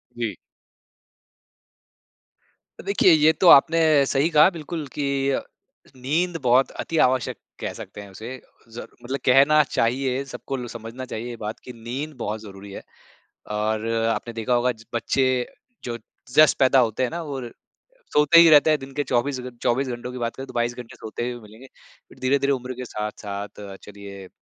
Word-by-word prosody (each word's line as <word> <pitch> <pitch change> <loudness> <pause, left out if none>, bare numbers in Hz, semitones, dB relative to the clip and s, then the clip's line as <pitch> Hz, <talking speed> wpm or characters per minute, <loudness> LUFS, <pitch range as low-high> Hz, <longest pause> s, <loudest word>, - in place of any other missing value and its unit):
जी। - - -3 2.5
देखिए 395 - +4
ये 155 -1 +6
तो 185 - +5
आपने 165 +3 +7 0.3
सही 140 +4 +1
कहा 155 +1 +6
बिल्कुल 160 -1 -6
की 140 -1 -1
अ, - - 0 0.5
नींद 160 +7 -1
बहुत 130 +1 +3
अति-आवश्यक 130 -6 0 0.2
कह - - -4
सकते 105 - -9
हैं 100 - -11
उसे 110 +7 -8
अ, 120 - -26
ज़र 115 - -8 0.2
मतलब 130 +3 -3
कहना 140 +4 +6
चाहिए 130 +1 -1
सबको 135 0 -6
ल 125 -1 -6
समझना 120 +2 -8
चाहिए 120 -1 -6
ये 120 - -6
बात 105 +1 -5
की 125 - -9
नींद 125 +7 -6
बहुत 110 -2 -4
ज़रूरी 100 -1 -11
है। - - -8 0.7
और 110 +1 -1 0.3
आपने 120 - -6
देखा 115 +2 -1
होगा 125 +1 +2 0.2
बच्चे 130 +3 +1 0.6
जो 120 -1 -4 0.4
जस्ट 155 -2 +6
पैदा 135 0 +4
होते 120 -1 +1
हैं 125 - 0
ना 170 - -4
वो 140 -4 -5 0.7
सोते 150 +3 +5
ही 170 - +8
रहते 150 0 +7
हैं 155 - +3
दिन 135 0 -10
के 145 - 0
24 130 +1 -1
घ 125 0 -7
24 130 +3 +1
घंटों 125 0 -5
की 125 - -6
बात 115 -1 -3
करें 135 - -7
तो - - -11
22 120 0 0
घंटे 120 -1 -10
सोते 120 +2 -5
हुए 120 -1 -7
मिलेंगे, 110 +5 -14 0.4
फिर - - -18
धीरे-धीरे 140 +2 +1
उम्र 130 -1 -4
के 125 +1 -6
साथ-साथ 105 -2 -6 0.2
चलिए, 100 -2 -11
125 Hz, 170 wpm, -23 LUFS, 115-140 Hz, 2.5 s, ही